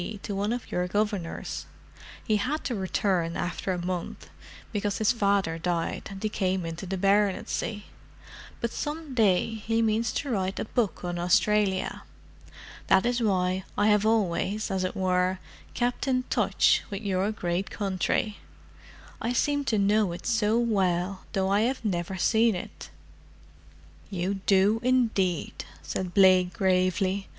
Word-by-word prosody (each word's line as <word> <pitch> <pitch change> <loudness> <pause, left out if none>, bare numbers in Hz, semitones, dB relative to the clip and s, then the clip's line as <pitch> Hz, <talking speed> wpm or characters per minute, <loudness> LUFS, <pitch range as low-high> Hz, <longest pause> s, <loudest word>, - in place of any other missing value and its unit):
to 205 - -4
one 205 +2 -1
of 245 0 -4
your 180 0 0
Governors. 205 -3 -2 0.6
He 215 - +2
had 280 +9 -2
to 255 - -2
return 185 -4 0
after 180 +2 -2
a 180 - -1
month, 180 -2 -5 0.4
because 205 -1 -1
his 220 +1 +3
father 200 -7 +1
died 170 -1 -2
and 195 +1 -8
he - - +2
came 190 -3 -1
into 165 +3 -6
the 190 +1 -2
baronetcy, 205 +1 0 0.8
but 235 - -1
some 300 -1 -4
day 220 -2 +2
he 225 +1 -1
means 220 +1 +1
to 280 - -2
write 190 -3 -1
a - - -2
book 215 -4 -1
on 175 0 -3
Australia. 190 +2 +2 0.9
That 190 +2 +4
is 245 0 +1
why 185 -3 +1
I 205 +1 +3
have 210 -1 +4
always, 215 -1 0
as 190 -1 0
it 185 - -2
were, 185 0 +1 0.4
kept 245 +2 -1
in 255 -1 +1
touch - - +3
with 200 0 -5
your 195 +1 0
great 180 -2 -2
country. 205 +2 -1 0.8
I 235 +2 -1
seem 285 +3 +1
to 220 - +1
know 205 -1 +3
it 175 - -9
so 220 -1 +2
well, 195 -5 0
though 190 0 +1
I 200 +2 +3
have 245 +1 -1
never 185 -1 -2
seen 225 +3 +3
it." 180 - -8 1.2
"You 195 +1 -2
do, 200 +3 +4
indeed," 225 -9 +1 0.2
said 185 -2 -4
Blake 185 -2 +5
gravely. 185 +1 +1
200 Hz, 150 wpm, -27 LUFS, 185-220 Hz, 1.2 s, Blake